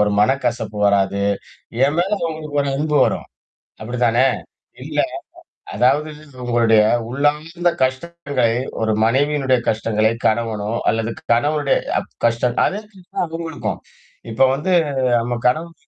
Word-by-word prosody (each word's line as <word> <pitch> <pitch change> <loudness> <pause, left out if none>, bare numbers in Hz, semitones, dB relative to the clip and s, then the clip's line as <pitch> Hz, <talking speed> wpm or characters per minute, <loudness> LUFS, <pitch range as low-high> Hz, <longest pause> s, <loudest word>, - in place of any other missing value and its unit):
ஒரு 105 0 +3
மனக்கசப்பு 120 -3 0
வராது. 100 0 +2 0.6
என் 145 - +1
மேல 185 +3 +1 0.2
உங்களுக்கு 155 -2 -4
ஒரு 140 - -2
அன்பு 150 +1 0
வரும். - - -2 0.5
அப்பிடிதானே! 120 +2 +1 0.6
இல்லயா! - - -1 0.6
அதாவது 145 +5 +2 0.3
உங்களுடைய 115 -3 +4 0.3
உள்ளார்ந்த 150 +6 0
கஷ்டங்கள் 130 -3 0 0.3
ஒரு 110 -1 +1
மனைவியினுடைய 135 +1 +2
கஷ்டங்களை, 110 0 +1 0.2
கணவனோ 110 -2 0 0.2
அல்லது 115 0 0 0.2
கணவனுடைய 145 +4 +2 0.2
அ - - +1 0.2
கஷ்டம் 120 +1 +1
அத - - +1
மாரிதான் 190 -4 -5
அவுங்களுக்கும். 165 -1 -4 0.5
இப்ப 120 +4 +4
வந்து 160 +7 -2 0.5
நம்ம 120 +1 -2
கணவன் 165 +6 0
130 Hz, 115 wpm, -20 LUFS, 115-150 Hz, 0.6 s, உங்களுடைய